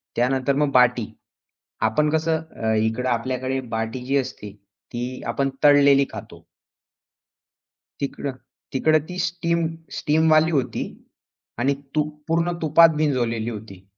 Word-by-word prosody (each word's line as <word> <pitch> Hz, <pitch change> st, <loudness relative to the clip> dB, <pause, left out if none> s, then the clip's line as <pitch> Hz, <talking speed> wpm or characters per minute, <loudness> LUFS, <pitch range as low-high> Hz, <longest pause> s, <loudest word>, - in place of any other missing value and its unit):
त्यानंतर 130 Hz, +2 st, +1 dB
मग 145 Hz, -1 st, +1 dB
बाटी. 125 Hz, -3 st, +4 dB, 0.8 s
आपण 150 Hz, +7 st, +1 dB
कसं 160 Hz, +1 st, 0 dB, 0.2 s
अ, 110 Hz, 0 st, +2 dB
इकडे 110 Hz, +4 st, 0 dB
आपल्याकडे 130 Hz, +2 st, -1 dB, 0.2 s
बाटी 115 Hz, +3 st, -3 dB
जी 140 Hz, +2 st, +1 dB
असते, 125 Hz, -6 st, -4 dB, 0.4 s
ती 125 Hz, +2 st, -5 dB
आपण 135 Hz, 0 st, 0 dB
तळलेली 140 Hz, -1 st, +6 dB
खातो. -, -, -10 dB, 1.5 s
तिकडं 140 Hz, 0 st, -3 dB, 0.4 s
तिकडं 155 Hz, +4 st, +3 dB
ती 180 Hz, -, -6 dB
स्टीम 170 Hz, -1 st, 0 dB, 0.3 s
स्टीमवाली 155 Hz, +1 st, +3 dB
होती 130 Hz, -6 st, -1 dB, 0.8 s
आणि 135 Hz, +3 st, +2 dB, 0.2 s
तूप 150 Hz, 0 st, 0 dB
पूर्ण 165 Hz, +1 st, +1 dB
तुपात 160 Hz, +1 st, +5 dB
भिंजवलेली 120 Hz, -6 st, 0 dB
होती. 105 Hz, -4 st, -9 dB
135 Hz, 115 wpm, -23 LUFS, 120-155 Hz, 1.5 s, तळलेली